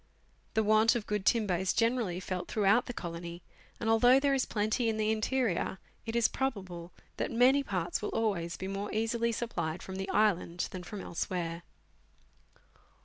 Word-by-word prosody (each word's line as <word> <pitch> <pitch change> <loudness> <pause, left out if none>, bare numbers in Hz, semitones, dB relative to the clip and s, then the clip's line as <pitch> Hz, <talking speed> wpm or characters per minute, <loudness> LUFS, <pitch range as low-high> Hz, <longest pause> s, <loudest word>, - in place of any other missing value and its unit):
The 220 - +3
want 215 +2 +4
of 225 -3 -2
good 210 -2 -2
timber 210 -6 +3
is 190 +1 0
generally 230 -6 +1
felt 185 -1 -4
through 210 -2 -1
out 225 +6 +4
the - - -3
colony, 170 -4 -6 0.4
and, 225 - -3
although 245 +4 +6
there 280 0 +2
is 265 -2 +1
plenty 220 +3 0
in 220 - -1
the 215 0 +1
interior, 220 -4 0 0.3
it 225 - -3
is 235 -1 +4
probable 185 -10 -4 0.3
that - - -1
many 250 +4 +4
parts 180 -9 -2
will 210 - -2
always 190 -7 -1
be 190 - -5
more 195 +1 -4
easily 230 +1 0
supplied 195 -8 -3
from 190 0 -6
the 195 0 -4
island 180 -5 +1
than 185 - -6
from 195 +3 -7
elsewhere. 170 -1 -3
210 Hz, 175 wpm, -31 LUFS, 180-230 Hz, 0.4 s, although